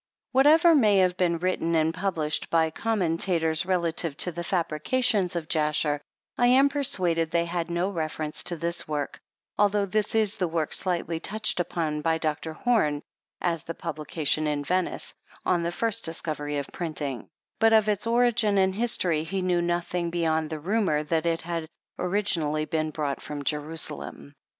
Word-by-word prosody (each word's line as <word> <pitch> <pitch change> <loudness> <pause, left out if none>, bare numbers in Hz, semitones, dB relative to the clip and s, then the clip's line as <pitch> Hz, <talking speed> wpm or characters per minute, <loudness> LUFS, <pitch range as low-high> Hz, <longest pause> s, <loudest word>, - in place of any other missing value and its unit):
Whatever 310 +6 +6
may 215 -9 +5
have 185 -1 +3
been 175 -2 +1
written 170 -1 0
and 160 0 +2
published 165 -5 -1
by 160 -1 +2
commentators, 170 -5 0
re 190 - +3
lative 165 -3 0
to 180 - +2
the 175 +1 -5
fabrications 185 +4 0
of 165 -2 -3
Jasher, 150 -2 +1 0.4
I 245 - +5
am 265 +3 +5
persuaded 180 - +1
they 170 0 +1
had 170 0 -3
no 175 +3 0
reference 155 -3 -3
to 175 - -1
this 170 +1 -3
work, 150 -2 -3 0.4
although 205 0 +3
this 210 +2 0
is 215 -1 +2
the 180 - +1
work 160 -2 -2
slightly 170 -3 -1
touched 210 +2 0
upon 160 -3 -1
by 160 +1 +1
Dr. 155 0 -2
Home, 155 -9 +1 0.4
as 170 -3 -1
the 165 - -5
publication 155 -1 -1
in 145 -1 -1
Venice, 180 +4 -1 0.3
on 175 -2 +2
the 170 0 -1
first 225 +4 -1
discovery 150 -3 -2
of 140 - -2
printing; 150 -7 -4 0.3
but 225 0 +5
of 220 -1 +5
its 210 +1 0
origin 235 -3 +3
and 190 0 +3
history 185 -8 0
he 185 +3 -3
knew 180 -1 +2
nothing 175 0 -1
beyond 160 -2 0
the 155 - -4
rumor 180 -3 +1
that 160 +2 0
it 165 0 0
had 165 -1 -4 0.3
originally 175 -6 0
been 155 0 -1
brouglit 145 -3 -3
from 145 -1 -6
Jerusalem. 150 -1 -4
170 Hz, 165 wpm, -26 LUFS, 155-195 Hz, 0.4 s, Whatever